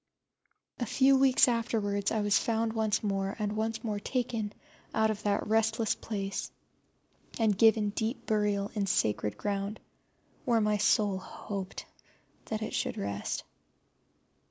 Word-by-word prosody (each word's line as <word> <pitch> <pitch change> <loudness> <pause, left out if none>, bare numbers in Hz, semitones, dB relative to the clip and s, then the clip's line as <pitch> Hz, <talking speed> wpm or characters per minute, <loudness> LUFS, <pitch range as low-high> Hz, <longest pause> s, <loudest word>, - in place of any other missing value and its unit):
A 240 - 0
few 270 +4 +4
weeks 265 -1 +5
afterwards 215 -4 0
I 220 - 0
was 205 -1 +3
found 225 -1 0
once 220 -2 0
more, 195 -1 -1
and 210 -1 -2
once 220 +1 -2
more 210 -3 -2
taken 230 -2 -2 0.4
out 220 0 +3
of 215 -1 -5
that 205 -1 0
restless 225 0 +2
place 195 -3 -4 0.9
and 220 -3 +3
given 220 0 +4
deep 220 +4 -3
burial 205 -2 0
in 205 -2 -1
sacred 105 - 0
ground, 200 +1 -2 0.6
where 235 -2 +3
my 210 -1 +2
soul 205 -1 +2
hoped 195 0 -6 0.6
that 220 0 -3
it - - -5
should - - -1
rest. 100 0 -3
215 Hz, 135 wpm, -30 LUFS, 200-225 Hz, 0.9 s, weeks